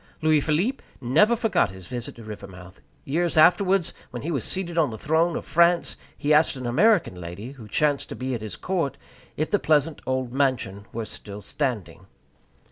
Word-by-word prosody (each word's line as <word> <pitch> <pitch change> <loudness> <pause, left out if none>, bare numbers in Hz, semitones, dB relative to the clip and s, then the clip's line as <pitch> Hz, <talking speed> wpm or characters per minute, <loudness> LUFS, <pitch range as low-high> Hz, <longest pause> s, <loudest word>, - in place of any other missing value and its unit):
Louis 155 -1 +4
Philippe 175 - 0 0.2
never 155 - +4
forgot 225 -1 +1
his 95 -1 -11
visit 120 +4 -6
to 115 - -11
Rivermouth. 95 -4 -10 0.2
Years 165 +4 0
afterwards, 185 +2 +4 0.2
when 120 0 -7
he 165 - -2
was 135 -8 -1
seated 185 -3 -1
on 165 -3 +3
the 110 - -6
throne 160 +7 +1
of - - -4
France, 170 +1 +3 0.2
he 150 0 +2
asked 150 0 +4
an 130 -1 -6
American 190 - +3
lady, 90 +9 -7
who 125 -6 -12
chanced 145 +6 0
to - - -6
be 130 +1 -3
at 115 - -3
his 105 -5 -5
court, 165 - -2 0.4
if 155 - -1
the 205 - +3
pleasant 155 0 +1
old 130 -2 -1
mansion 125 -8 -1
were 115 -1 -4
still 105 -1 -8
standing. 125 - -3
140 Hz, 185 wpm, -25 LUFS, 115-170 Hz, 0.4 s, Louis